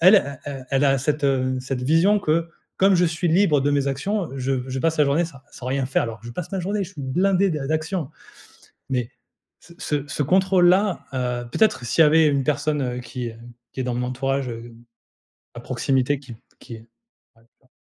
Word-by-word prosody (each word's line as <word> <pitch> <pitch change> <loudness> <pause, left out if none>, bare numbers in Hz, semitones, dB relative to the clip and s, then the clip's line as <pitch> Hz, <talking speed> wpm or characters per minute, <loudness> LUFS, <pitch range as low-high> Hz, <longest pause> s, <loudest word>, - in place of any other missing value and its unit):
e 140 -9 +1
e 135 -2 -7
elle 140 +1 +2
a 135 0 +4
cette 150 +1 -1
mmh, 130 -1 +1
cette 130 -1 -4
vision 165 +10 +3
que, 165 -1 0 0.3
comme 195 0 +5
je 175 0 +4
suis 165 +2 -1
libre 165 -3 +4
de 145 +1 +1
mes 140 -1 +1
actions, 180 +8 -1
heu, 135 - -7
je 135 +1 -1 0.2
je 130 - -3
passe 165 +1 0
la 150 - +5
journée 150 +5 +2
sans 160 -5 -12
sans 125 - -10
rien 135 0 0
faire. 135 - +1
Alors 115 -1 -5
que 120 - -10
je 120 - -7
passe 180 +7 -6
ma 195 - -2
journée, 200 +3 -1
je 190 - -9
suis 145 - -8
blindé 185 +8 +2
d 155 - -2
d'actions, 155 0 -2 0.8
mais 125 -3 -1 0.5
ce 170 - -17
ce 145 -1 -2
ce 145 +1 -2
contrôle 185 +2 +4
là, 190 +1 +2
heu, 125 -2 -2
peut-être 215 - +2
s'il 165 - +4
y - - +7
avait 160 +1 +5
une 140 -2 +1
personne, 150 -1 0
heu, 125 -1 -3
qui, 125 -1 -5
hem, 115 +1 -12 0.2
qui 130 - -6
est - - -1
dans 125 -1 -2
mon 125 +1 -2
entourage, 135 +1 -1
heu, 115 0 -9 0.8
à - - -7
proximité 130 +2 0
qui 125 -5 -11 0.2
qui 115 - -10
est 115 +1 -14 0.5
avec 115 +1 -27
moi 130 - -31
140 Hz, 220 wpm, -23 LUFS, 130-165 Hz, 0.8 s, y